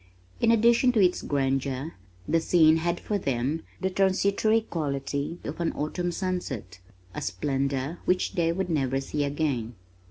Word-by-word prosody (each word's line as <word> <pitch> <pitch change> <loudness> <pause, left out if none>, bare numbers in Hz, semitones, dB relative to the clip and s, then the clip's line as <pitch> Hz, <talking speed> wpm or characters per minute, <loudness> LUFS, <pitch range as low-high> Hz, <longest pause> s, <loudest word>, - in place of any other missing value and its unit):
In 230 - +3
addition 235 +2 +5
to 225 - +2
its 180 -2 +3
grandeur 135 +1 -1 0.3
the 165 - +3
scene 160 -1 +5
had 170 +1 -1
for 205 -1 -2
them 135 +1 -1 0.2
the 190 - 0
transitory 200 +3 +2
quality 140 -4 -3
of 150 +4 -5
an 170 - +1
autumn 175 +4 -2
sunset, 160 - -4 0.3
a - - -5
splendor 135 - -2
which 180 0 +1
they 165 -1 +1
would 180 +1 -2
never 135 -4 +1
see 145 +2 -2
again. 140 -5 -1
160 Hz, 150 wpm, -27 LUFS, 135-185 Hz, 0.3 s, addition